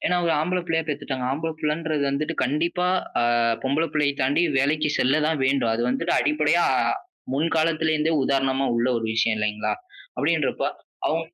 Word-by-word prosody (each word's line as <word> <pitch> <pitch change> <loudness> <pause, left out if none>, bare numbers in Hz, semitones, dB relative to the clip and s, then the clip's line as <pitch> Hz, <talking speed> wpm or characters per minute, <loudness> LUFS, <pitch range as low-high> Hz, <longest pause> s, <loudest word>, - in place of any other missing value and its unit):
ஏனா 180 - +2
ஒரு 165 - +2
ஆம்பள 180 +3 0
புள்ளைய 165 0 +1
பெத்துட்டாங்க. 140 -3 -3
ஆம்பள 160 +4 -2
புள்ளைன்றது 155 -1 -1
வந்துட்டு 150 +4 -2
கண்டிப்பா, 170 +7 0 0.3
ஆ - - +2 0.4
பொம்பள 140 +5 +1
புள்ளையை 150 -2 +1
தாண்டி 140 +6 +2 0.2
வேலைக்கு 150 +3 +1
செல்ல 135 +5 +2
தான் 160 -1 0
வேண்டும். 130 -4 +2
அது 115 - -1
வந்துட்டு 165 +7 0
அடிப்படையா 305 0 +2 0.7
முன்காலத்துலேருந்தே 160 0 +1
உதாரணமா 135 0 +1
உள்ள 120 +2 +1
ஒரு 115 - -3
விஷயம் 110 0 +2
இல்லைங்களா, 105 0 -1 0.4
அப்டின்றப்போ - - 0 0.4
அவ் 160 - 0
150 Hz, 150 wpm, -24 LUFS, 135-160 Hz, 0.7 s, ஏனா